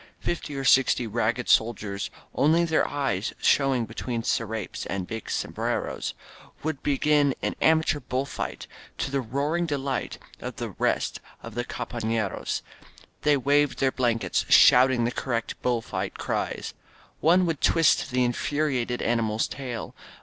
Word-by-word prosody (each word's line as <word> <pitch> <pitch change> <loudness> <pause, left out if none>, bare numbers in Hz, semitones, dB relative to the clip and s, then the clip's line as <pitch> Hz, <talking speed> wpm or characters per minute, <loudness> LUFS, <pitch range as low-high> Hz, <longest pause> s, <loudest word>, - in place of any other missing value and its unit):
Fifty 160 -4 -3
or 135 - -3
sixty 130 -2 +4
ragged 115 +3 -1
soldiers, 105 -3 +1 0.2
only 165 +4 +3
their 160 -1 +2
eyes 135 -9 -1
showing 135 -4 +2
between 115 +1 -4
scrapes 110 -3 -2
and 95 -2 -3
big 110 +3 -6
sombreros, - - -2 0.5
would 155 -3 -2
be 140 -2 0
gin 145 -2 +3
an - - 0
amateur 160 -1 +3
bull 130 0 -2
fight, - - -5 0.3
to 135 - -2
the 140 -1 0
roaring 145 +8 -1
delight 140 -3 -2 0.2
of - - -6
the - - -4
rest - - -1 0.2
of 115 - -8
the 120 +2 -2
compafleros. 115 -4 -3 0.6
They 150 -1 +4
waved 145 +1 +2
their 135 -1 +2
blankets, 120 -3 0
shouting 125 -1 +7
the 120 - +1
correct 120 -3 -3
bull 120 -2 0
fight - - -4
cries. - - -3 0.5
One 180 +3 +4
would 165 -4 -2
twist 165 -2 +3
the 125 0 +1
infuriated 125 0 -1
animal's 115 -2 +1
tail. 125 -4 -6
130 Hz, 140 wpm, -26 LUFS, 115-145 Hz, 0.6 s, shouting